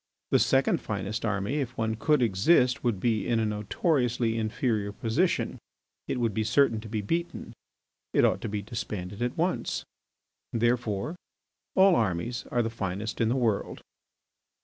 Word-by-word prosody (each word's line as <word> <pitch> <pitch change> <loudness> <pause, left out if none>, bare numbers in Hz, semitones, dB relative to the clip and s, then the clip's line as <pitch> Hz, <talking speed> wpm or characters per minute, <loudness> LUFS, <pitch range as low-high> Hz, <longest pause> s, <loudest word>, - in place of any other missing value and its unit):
The - - +5
second 135 0 +3
finest 100 +1 -3
army, 105 +6 -1
if 130 -2 -4
one 110 0 0
could 130 +5 +2
exist, 125 - +3
would 115 -6 0
be 110 -1 0
in 115 -1 +2
a 110 - +1
notoriously 115 - 0
inferior 110 -2 -1
position; 120 - 0 0.5
it 125 - -2
would 115 -3 +1
be 110 - 0
certain 115 -1 +3
to 110 - -9
be 110 -1 -2
beaten. 170 +10 -3 0.6
It - - +4
ought - - +1
to - - -3
be 105 0 -3
disbanded 100 -2 -5
at 120 0 -1
once. 175 +3 -1 0.7
Therefore, 120 - 0 0.6
all 190 0 +6
armies 115 +2 -1
are 120 - +1
the 115 - -2
finest 105 0 -3
in 115 - +3
the 120 - +1
world. 115 -6 0
115 Hz, 155 wpm, -28 LUFS, 105-125 Hz, 0.7 s, all